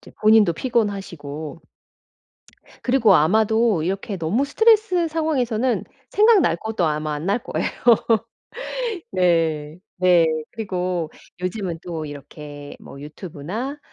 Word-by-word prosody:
이제 - - -15
본인도 215 -5 +5
피곤하시고 175 - -3 1.2
그리고 245 -6 +4
아마도 215 +3 +3
이렇게 195 +4 -3
너무 185 - 0
스트레스 395 +1 +3
상황에서는 260 -7 0 0.3
생각날 415 - +4
것도 220 -2 -2
아마 155 0 -1
안 150 +3 -5
날 200 +4 +2
거예요. - - -2 1.5
네. 165 -4 +1 0.2
네. 180 -2 +5 0.3
그리고 180 -6 -3 0.3
요즘은 185 -3 -3
또 165 -3 -5
이렇게 145 0 -10
뭐 140 - -12
유튜브나 180 - -6
185 Hz, 255 characters per minute, -22 LUFS, 160-230 Hz, 1.5 s, 본인도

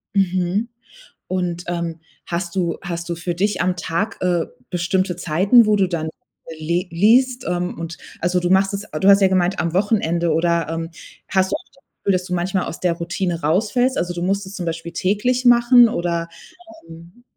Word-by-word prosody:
Mhm. 190 +3 +1 0.6
Und, 180 -2 -2
ähm, 170 -2 -3 0.3
hast 170 0 -3
du 175 -3 0
hast 170 -1 -5
du 170 - -2
für 170 +1 -3
dich 205 +4 0
am 180 0 +1
Tag, 180 +6 -2
äh, 175 -2 +1 0.2
bestimmte 180 0 0
Zeiten, 190 +8 +4
wo 210 0 +3
du 195 -2 +3
dann 160 -3 -3 0.5
le 170 +3 -1
liest, 245 +8 +3
ähm, 180 0 -2
und 165 0 -6 0.2
also, 180 +1 +1
du 175 0 -1
machst 195 +1 +3
es 200 +1 -6
ah, 155 - -2
du 190 - +2
hast 200 0 +7
ja 190 - +6
gemeint 185 0 +1
am 170 -1 -1
Wochenende 175 -5 +1
oder, 170 0 +1
ähm, 165 0 -4 0.4
hast 190 0 +1
du - - +2
auch - - -13
das 275 - -26 0.2
Gefühl, 200 - +1
dass 180 0 0
du 180 - -4
manchmal 185 +2 -1
aus - - -7
der 180 -2 +1
Routine 170 0 -3
rausfällst? 220 - +1
Also, 175 0 -2
du 175 - -4
musst 195 +1 -1
es 190 - -10
zum 180 -3 -5
Beispiel 165 0 -4
täglich 245 +7 0
machen 240 0 +6
oder, 170 -5 -2 0.6
ähm 170 +8 -14
180 Hz, 195 wpm, -20 LUFS, 170-200 Hz, 0.6 s, hast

